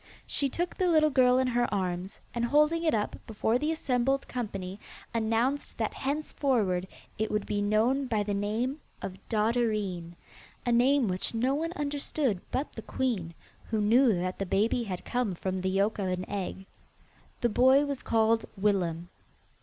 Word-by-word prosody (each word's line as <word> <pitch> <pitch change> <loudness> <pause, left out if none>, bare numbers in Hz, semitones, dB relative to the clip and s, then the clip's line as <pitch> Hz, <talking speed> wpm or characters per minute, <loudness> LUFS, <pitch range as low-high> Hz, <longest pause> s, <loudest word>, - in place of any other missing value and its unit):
She 280 - +1
took 350 +6 -2
the 370 - +1
little 310 -3 +4
girl 255 -2 +5
in 260 - +3
her 245 -1 +1
arms, 185 -1 -2
and 235 - -1
holding 300 +6 +3
it 315 -7 +3
up 210 -1 -2
before 220 +2 0
the 300 +3 0
assembled 270 -3 0
company 195 -5 -5 0.3
announced 230 +5 0
that - - -1
henceforward 260 -10 0 0.3
it 220 - 0
would 210 -1 -1
be 205 -1 -1
known 225 +7 +2
by 215 -4 +1
the 205 0 -2
name 225 +8 -1 0.2
of 190 0 -5
Dotterine 210 -6 0 0.5
a 240 - +1
name 250 +2 +4
which 185 +4 0
no 250 +4 +2
one 325 +4 -1
understood 285 - -1
but 275 +3 -2
the 225 - -7
queen, 210 -11 -2 0.3
who 220 - 0
knew 235 +4 +5
that 180 +1 -3
the 195 - -1
baby 215 +6 +2
had 190 -6 -5
come 245 -7 -1
from 185 +2 -3
the 190 - 0
yolk 200 +3 +1
of 195 - -1
an 185 0 -2
egg. 195 -1 -4 0.8
The 240 - +3
boy 260 +5 +5
was 280 -2 -3
called 225 0 +2
Willem. 175 -4 0
225 Hz, 170 wpm, -29 LUFS, 195-265 Hz, 0.8 s, girl